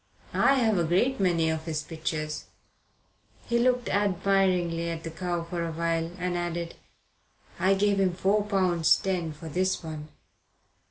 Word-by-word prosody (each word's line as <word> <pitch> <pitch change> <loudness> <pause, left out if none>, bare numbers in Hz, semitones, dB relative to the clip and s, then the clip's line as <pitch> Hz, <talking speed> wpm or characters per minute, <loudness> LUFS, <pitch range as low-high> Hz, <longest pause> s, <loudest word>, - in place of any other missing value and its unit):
I 275 - +4
have 220 -7 +2
a - - +2
great 190 +11 +1
many 170 -4 +2
of 160 0 -4
his 155 -2 -2
pictures." 155 -1 -4 1.0
He 235 0 +1
looked 250 0 +2
admiringly 185 -4 +1
at 165 -1 -5
the 165 - -5
cow 175 0 -3
for 170 0 -4
a 165 - -3
while, 165 0 -1
and 180 -1 -2
added: 175 -1 -3 0.9
"I 190 +2 +4
gave 200 0 +2
him 185 -2 +2
four 195 +3 +2
pounds 180 -5 +3
ten 180 -4 -2
for 155 +2 -10
this 185 +4 0
one." 155 -2 -6
175 Hz, 155 wpm, -27 LUFS, 165-195 Hz, 1.0 s, I